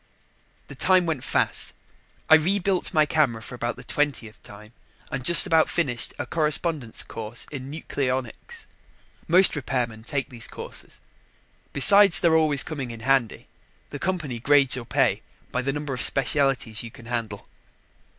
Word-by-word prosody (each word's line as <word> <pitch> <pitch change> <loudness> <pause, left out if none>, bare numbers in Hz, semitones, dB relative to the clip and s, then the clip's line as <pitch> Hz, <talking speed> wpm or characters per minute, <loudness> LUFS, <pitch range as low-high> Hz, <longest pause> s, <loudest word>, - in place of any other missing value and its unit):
The - - -10
time 185 -1 +2
went 155 -6 -3
fast. - - -1 0.5
I - - +5
rebuilt 185 +3 +2
my 155 -1 +3
camera 145 -7 0
for 110 - -10
about 120 0 -4
the 125 - -12
twentieth 125 -6 -3
time 105 +2 -14 0.4
and 135 -3 -4
just 170 +7 +8
about 160 -1 +2
finished 130 -9 -2
a - - -4
correspondence 155 -5 -1
course 115 +1 -4
in 135 -2 -7
nucleonics. 140 - -5 0.6
Most 185 +3 +6
repairmen 125 -6 -3
take 140 +1 -4
these 120 -3 -4
courses. - - -10 0.7
Besides 200 +6 +6
their 165 -2 +3
always 155 -4 +2
coming 140 -6 -6
in 115 -1 -9
handy, 135 -2 0 0.5
the 145 - -7
company 160 -10 -3
grades 140 +1 +3
your 125 -2 -7
pay - - 0 0.3
by 125 - -1
the 135 +2 -2
number 145 0 -5
of 125 - -4
specialties 135 -4 +1
you 115 - -8
can 115 +1 -16
handle. 115 -4 -5
135 Hz, 150 wpm, -24 LUFS, 120-160 Hz, 0.7 s, just